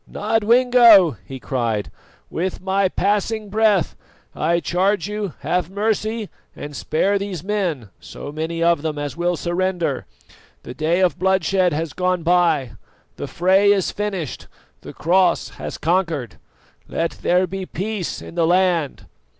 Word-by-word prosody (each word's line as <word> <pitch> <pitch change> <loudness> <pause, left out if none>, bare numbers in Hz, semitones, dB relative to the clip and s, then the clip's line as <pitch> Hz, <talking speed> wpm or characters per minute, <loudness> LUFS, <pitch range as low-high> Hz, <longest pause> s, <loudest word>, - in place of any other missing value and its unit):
"Nodwengo," 225 - +5
he 135 -1 -8
cried, 115 -6 -2 0.4
"with 185 +3 -2
my 190 +1 +1
passing 210 +2 -1
breath 210 -4 +2 0.4
I 170 +2 +1
charge 185 +2 0
you 210 -5 -4
have 170 +4 -1
mercy 215 +2 -1 0.3
and 145 0 -8
spare 195 +9 0
these 195 -5 -5
men, 180 - -2
so 145 - -9
many 160 +2 -3
of 170 -3 +3
them 155 -1 -3
as 145 -1 -4
will 175 +1 0
surrender. 175 -5 -2 0.6
The 125 - -8
day 160 +6 0
of 180 -2 +1
bloodshed 190 -1 +2
has 155 -1 -3
gone 180 -1 0
by, 165 -7 +2 0.5
the - - -5
fray 190 +3 +3
is 195 -3 +1
finished, 195 - -4 0.3
the - - -9
Cross 175 +1 +2
has - - -5
conquered. 165 - -1 0.5
Let 165 0 -2
there 180 +1 +3
be 190 0 -6
peace 200 -2 -4
in - - -10
the 165 -1 +1
land." 175 -4 +1
180 Hz, 140 wpm, -21 LUFS, 160-200 Hz, 0.6 s, Nodwengo